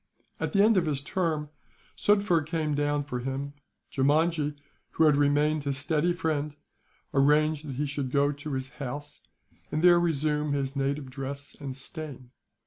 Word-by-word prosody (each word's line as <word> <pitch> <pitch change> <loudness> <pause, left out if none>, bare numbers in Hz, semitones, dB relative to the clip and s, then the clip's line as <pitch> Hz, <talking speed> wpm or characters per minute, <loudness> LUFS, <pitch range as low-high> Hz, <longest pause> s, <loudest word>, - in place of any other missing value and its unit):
At - - -2
the 200 0 +5
end 220 -1 +5
of 170 -3 +2
his 145 -3 0
term, 155 0 -1 0.5
Sufder 200 -5 +3
came 155 -1 -1
down 145 0 +1
for 125 -3 -4
him. 135 +3 -4 0.4
Jeemajee, 150 +2 +2 0.4
who - - +3
had 150 -2 +6
remained 145 +1 +2
his 140 -1 -1
steady 155 +4 +1
friend, 150 -4 -1 0.6
arranged 150 +2 +3
that 135 - -5
he 145 +3 -1
should 140 -2 -3
go 140 +2 +2
to 145 +1 -6
his 130 0 -3
house, 145 +3 -5 0.5
and 155 +2 -1
there 175 -1 +7
resume 150 -3 0
his 135 -1 -2
native 140 0 -1
dress 140 +2 -6
and 135 -2 -5
stain. 135 -2 -8
145 Hz, 160 wpm, -28 LUFS, 140-155 Hz, 0.6 s, there